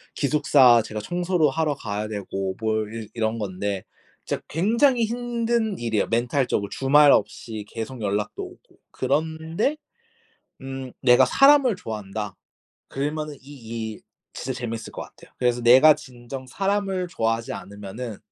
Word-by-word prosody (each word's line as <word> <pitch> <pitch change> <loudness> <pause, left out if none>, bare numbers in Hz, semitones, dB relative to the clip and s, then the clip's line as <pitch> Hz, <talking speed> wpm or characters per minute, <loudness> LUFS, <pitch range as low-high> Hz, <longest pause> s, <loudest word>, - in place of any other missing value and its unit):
기숙사 140 -4 +5
제가 110 -1 -5
청소도 175 - +1
하러 155 0 0
가야 105 -4 -4
되고 95 -2 -4
뭘 110 -1 -1
이 110 -2 -6
이런 115 0 -1
건데, 100 -1 -3 0.4
진짜 - - -3
굉장히 235 - +3
힘든 235 -2 -1
일이에요, 115 -3 0
멘탈적으로. 120 -2 0
주말 145 +2 +5
없이 110 -3 -1
계속 115 +2 -6
연락도 105 0 -2
오고. - - -14
그런데 160 - -1 0.8
음 135 -1 -6
"내가 125 +1 +6
사람을 275 - +5
좋아한다." 105 - -5 0.5
그러면은 150 +2 -3
이 115 -5 -6
일 - - -19 0.3
진짜 130 - -4
재밌을 115 -2 -5
거 - - -7
같아요. - - -15
그래서 120 -1 +1
내가 130 +6 +8
진정 130 +1 -9
사람을 195 +1 -1
좋아하지 115 -6 -1
않으면은 100 +3 -7
130 Hz, 305 characters per minute, -24 LUFS, 110-160 Hz, 0.8 s, 내가